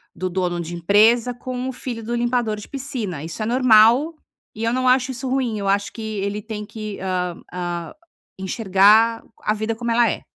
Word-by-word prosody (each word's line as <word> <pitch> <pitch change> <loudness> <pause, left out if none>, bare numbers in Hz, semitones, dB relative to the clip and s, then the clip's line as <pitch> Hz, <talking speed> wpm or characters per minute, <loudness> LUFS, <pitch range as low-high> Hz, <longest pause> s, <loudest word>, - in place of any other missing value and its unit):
do 185 +2 -3
dono 180 -1 -1
de 170 +1 -5
empresa, 220 +7 +4
com 255 +1 -5
o - - -2
filho 235 -3 -6
do 235 +2 -3
limpador 240 -2 0
de 210 - -9
piscina. 235 - -5
Isso 165 +6 -7
é - - -2
normal 245 +5 +5 0.4
e 220 - -5
eu 230 +1 +1
não 255 0 0
acho 255 +1 +3
isso 260 +1 -5
ruim. 255 -4 0
Eu 200 - -3
acho 200 +1 0
que 225 - -8 0.2
ele 200 +2 -2
tem 210 -1 -6
que, 215 -1 -7
hã 180 -2 -2
hã, 175 -2 -4 0.5
enxergar 210 +3 +3 0.2
a 210 - +1
vida 220 +1 -2
como 235 +1 -3
ela 235 0 +4
é. - - -4
220 Hz, 195 wpm, -21 LUFS, 195-240 Hz, 0.5 s, normal